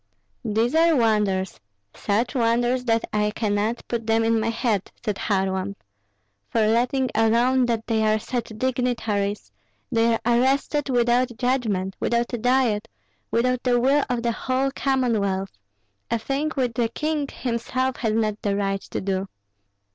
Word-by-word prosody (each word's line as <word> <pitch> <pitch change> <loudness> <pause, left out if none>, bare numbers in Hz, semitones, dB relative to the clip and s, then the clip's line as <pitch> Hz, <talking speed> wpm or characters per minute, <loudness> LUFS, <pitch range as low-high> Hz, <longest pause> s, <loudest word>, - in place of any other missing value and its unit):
"These 225 +4 0
are 330 0 +4
wonders, 210 -6 +1 0.3
such 225 +4 -1
wonders 240 0 +1
that 225 -1 +1
I 210 0 +2
cannot 215 +1 -1
put 230 -2 -3
them 225 0 +3
in 225 0 +2
my 220 +1 0
head," 225 -4 -1
said 210 -3 -1
Kharlamp; 190 -1 -1 0.7
"for 220 -2 +2
letting 245 +4 +1
alone 240 +3 +3
that 230 -2 -1
they 225 -1 0
are 215 - +3
such 235 +1 -4
dignitaries, 230 -5 -1 0.4
they 230 -1 +3
are - - -3
arrested 270 +4 +1
without 240 -1 +2
judgment, 215 -7 0
without 235 +1 0
a 240 - -1
diet, 240 -3 +2 0.4
without 250 +2 +1
the 245 -1 +2
will 275 +4 +3
of 245 -2 -1
the 235 - +1
whole 260 +3 -1
Commonwealth, 220 -9 0 0.6
a 235 - +1
thing 275 +7 -2
which 250 -4 0
the 230 -1 0
king 300 +3 -2
himself 255 +2 -2
has 220 -3 -1
not 215 -1 0
the 200 -1 0
right 195 -1 -1
to - - -5
do." 190 0 -2
230 Hz, 150 wpm, -24 LUFS, 215-255 Hz, 0.7 s, are